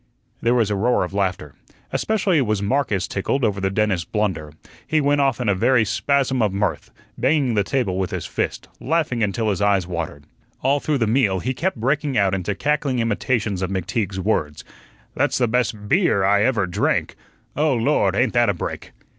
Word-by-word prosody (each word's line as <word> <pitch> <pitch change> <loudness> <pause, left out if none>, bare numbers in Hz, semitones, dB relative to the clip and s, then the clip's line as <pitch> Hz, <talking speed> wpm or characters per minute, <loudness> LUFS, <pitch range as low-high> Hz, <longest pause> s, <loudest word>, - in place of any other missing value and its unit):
There 120 +1 +2
was 110 -4 +2
a - - +1
roar 115 +3 +2
of 90 - -5
laughter. 95 -7 -2 0.4
Especially 200 -7 +1
was 110 -5 0
Marcus 100 -3 0
tickled 125 +7 -2
over 100 -3 0
the 95 - +1
dentist's 95 -3 0
blunder; 95 -7 -2 0.4
he 155 - +2
went 145 0 +2
off 135 -3 +1
in 125 - -2
a 100 - +4
very 115 +4 +3
spasm 130 +3 +1
of 105 -3 +2
mirth, 100 +1 -2 0.3
banging 145 -6 +2
the 105 -2 +2
table 100 -5 -1
with 95 -1 -1
his 90 -5 -4
fist, - - -3
laughing 155 -6 0
until 105 +1 0
his 100 - -3
eyes 100 -3 +2
watered. 85 -4 -5 0.4
All 140 +2 +2
through 150 0 0
the 115 - +1
meal 105 -4 +2
he 130 +7 -2
kept 170 +4 -2
breaking 140 +3 0
out 100 -2 +2
into 95 +1 -2
cackling 145 0 0
imitations 115 -3 -1
of 95 - -1
McTeague's 95 +1 -2
words: 80 -7 -1 0.5
"That's - - 0
the 125 - +2
best 110 -3 -1
BEER 165 - +2
I 100 +2 +3
ever 115 -6 +1
drank. 90 +3 -1 0.4
Oh, 150 -2 +2
Lord, 115 -6 +1
ain't 120 +1 +1
that 120 -2 +3
a 100 - 0
break!" - - -6
110 Hz, 190 wpm, -21 LUFS, 95-130 Hz, 0.5 s, a